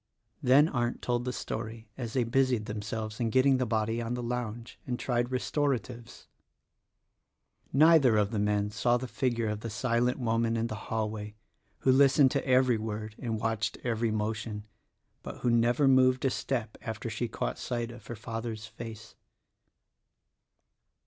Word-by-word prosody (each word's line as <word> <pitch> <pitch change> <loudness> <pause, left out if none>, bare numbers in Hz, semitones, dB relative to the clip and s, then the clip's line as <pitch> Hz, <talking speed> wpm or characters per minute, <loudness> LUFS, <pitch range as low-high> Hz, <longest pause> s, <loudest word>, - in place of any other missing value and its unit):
Then 140 +3 +6
Arndt 120 -5 -2
told 120 0 0
the 125 - -1
story 115 -1 -5
as 120 -3 -5
they 130 - +2
busied 125 -2 +1
themselves 110 +1 -5
in 115 -2 +1
getting 130 +3 +4
the 125 -1 0
body 115 +1 0
on 115 +1 -2
the 125 - -4
lounge 120 -1 -4
and 125 -1 -1
tried 120 -1 0
restoratives. 125 -3 -2 1.5
Neither 145 -5 +6
of 105 -1 +2
the 110 - -1
men 105 0 +1
saw 120 +3 +2
the 130 +1 -5
figure 120 -2 -1
of 105 0 -2
the 115 - -5
silent 120 +2 0
woman 115 -1 0
in 115 - 0
the 115 - -4 0.2
hallway 105 -1 -3 0.5
who 130 - +4
listened 135 0 +5
to 140 -1 -1
every 130 -3 +4
word 110 0 -4
and 115 -4 -2
watched 110 -1 -1
every 115 -1 0
motion 110 0 -3 0.3
— - - -47
but - - -8
who 120 - +2
never 120 +4 +3
moved 130 0 +4
a 135 - +3
step 120 -6 -3
after 110 0 -5
she 115 +2 -2
caught - - -3
sight 120 -1 -3
of 120 - -13
her 120 - -5
father's 115 -1 -5
face. 110 -1 -9
115 Hz, 160 wpm, -29 LUFS, 110-125 Hz, 1.5 s, Then